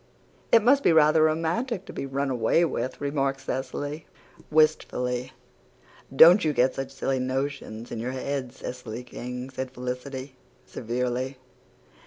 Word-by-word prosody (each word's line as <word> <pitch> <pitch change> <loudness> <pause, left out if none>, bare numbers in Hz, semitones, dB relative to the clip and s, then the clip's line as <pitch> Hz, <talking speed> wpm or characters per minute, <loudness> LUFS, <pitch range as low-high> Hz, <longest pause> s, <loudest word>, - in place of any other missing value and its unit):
"It 230 -2 +6
must 275 +4 +5
be - - +4
rather 155 0 +5
romantic 170 +8 0
to - - -10
be 135 - -4
run 135 0 -1
away 125 +8 +3
with," 130 -5 -3
remarked 140 -2 -1
Cecily, 145 +4 -4 0.4
wistfully. 130 -5 +1 0.8
"Don't 175 +8 +8
you 155 -2 +1
get 130 0 +3
such 135 0 -4
silly 135 -1 -1
notions 130 -3 -3
in 115 - -4
your 125 +3 -3
head, 130 -1 -3
Cecily 125 -2 -7
King," 125 +1 -7
said 130 0 -4
Felicity, 130 +2 -6 0.3
severely. 125 +3 -3
135 Hz, 135 wpm, -26 LUFS, 125-155 Hz, 0.8 s, Don't